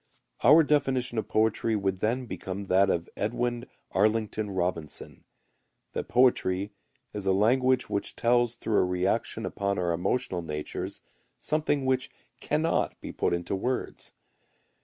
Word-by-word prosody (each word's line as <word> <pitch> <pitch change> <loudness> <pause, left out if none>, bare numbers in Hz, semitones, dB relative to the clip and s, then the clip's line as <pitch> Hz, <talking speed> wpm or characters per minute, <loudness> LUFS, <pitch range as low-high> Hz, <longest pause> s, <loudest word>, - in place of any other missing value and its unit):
Our 150 +7 +8
definition 130 -5 +1
of 110 - -4
poetry 110 +1 +1
would 95 -2 -1
then 120 +5 0
become 100 -3 -5
that 95 +1 +4
of 85 -1 0
Edwin 120 +3 -1 0.3
Arlington 110 +1 +1
Robinson, 90 -4 -4 0.7
that - - -3
poetry 100 -6 +2 0.4
is 105 -2 -4
a 95 - +4
language 125 +6 +3
which 100 - -2
tells 120 0 +2
through 110 -2 0
a - - +4
reaction 90 +1 -1
upon 100 0 -2
our 90 -1 0
emotional 90 +2 -1
natures 75 -2 -5 0.4
something 150 -3 0
which 130 -1 +1 0.3
cannot 155 +2 0
be - - -7
put - - 0
into 85 +2 -1
words. 125 +7 -3
110 Hz, 135 wpm, -28 LUFS, 95-125 Hz, 0.7 s, Our